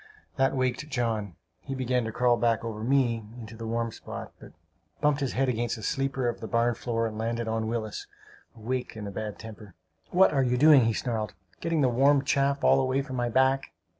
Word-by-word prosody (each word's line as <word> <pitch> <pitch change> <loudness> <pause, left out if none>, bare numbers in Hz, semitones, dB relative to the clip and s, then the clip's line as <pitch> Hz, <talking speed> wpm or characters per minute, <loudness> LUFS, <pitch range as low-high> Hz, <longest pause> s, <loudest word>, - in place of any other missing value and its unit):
That 135 0 +2
waked 130 +3 -1
John; 110 - -2 0.2
he 135 - -6
began 125 -2 0
to 110 - -3
crawl 120 +1 +3
back 115 -1 +1
over 110 -1 -5
me 120 -3 +2 0.2
into 110 -1 -9
the 115 0 -6
warm 115 0 -1
spot, - - -8
but - - -13 0.5
bumped 150 -1 +2
his 135 -3 -2
head 135 +1 +1
against 120 -1 -1
a 110 - -9
sleeper 135 +1 -1
of 120 - -2
the 110 - -6
barn 115 +1 +2
floor 115 0 -2
and 110 -1 -4
landed 115 +1 -2
on 110 0 -1
Willis, 110 -2 -4 0.5
who 110 - -15
waked 125 0 -3
in 105 - -6
a 100 - -5
bad 105 +1 -5
temper. 105 -4 -11 0.3
"What 190 +2 +5 0.2
you 125 0 +1
doing!" 145 -2 +7
he 115 - +2
snarled. 110 -3 -3 0.2
"Getting 165 -2 0
the 135 - +4
warm 135 +3 +4
chaff 140 0 +1
all - - +5
away 130 +1 0
from 130 -2 -7
my 120 -1 0
back!" 130 +2 +2
120 Hz, 210 wpm, -27 LUFS, 115-135 Hz, 0.5 s, doing